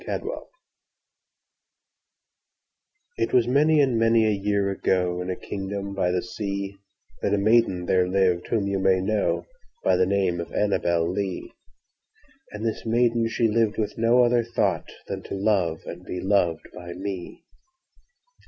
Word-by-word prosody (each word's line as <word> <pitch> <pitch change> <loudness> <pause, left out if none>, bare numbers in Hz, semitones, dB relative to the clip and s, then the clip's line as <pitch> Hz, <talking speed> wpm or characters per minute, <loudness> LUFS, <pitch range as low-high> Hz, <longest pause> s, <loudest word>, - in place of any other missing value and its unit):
Annabel - - -4 2.7
Lee - - +1
IT - - -11
was 120 -2 +4
many 150 +4 +4
and 130 -5 +2
many 115 0 +4
a 110 - +3
year 100 -1 0
ago, 90 -2 0
In 90 - -5
a 90 - -1
kingdom 100 +1 -5
by 95 -2 0
the 90 0 0
seaThat 100 -2 -5
a - - 0
maiden 100 -3 +3
there 90 0 +2
lived 90 -2 +1
whom 110 -4 0
you 100 -1 -1
may 95 0 +4
knowBy 105 +2 0 0.4
the 90 - +3
name 95 -3 +1
of 85 - -6
ANNABEL 85 -5 +1
LEE; 95 +1 -3 1.0
And 105 +2 -6
this 110 - -2
maiden 115 0 +2
she 115 +1 +1
lived 110 -1 +1
with 105 -2 -2
no 115 +2 +4
other 120 -1 +3
thoughtThan 115 +1 -3
to - - -5
love 95 -5 +1
and - - -8
be 90 - -5
loved 95 -5 +1
by 85 -1 -8
me. 95 -1 -6
100 Hz, 145 wpm, -25 LUFS, 90-115 Hz, 2.7 s, was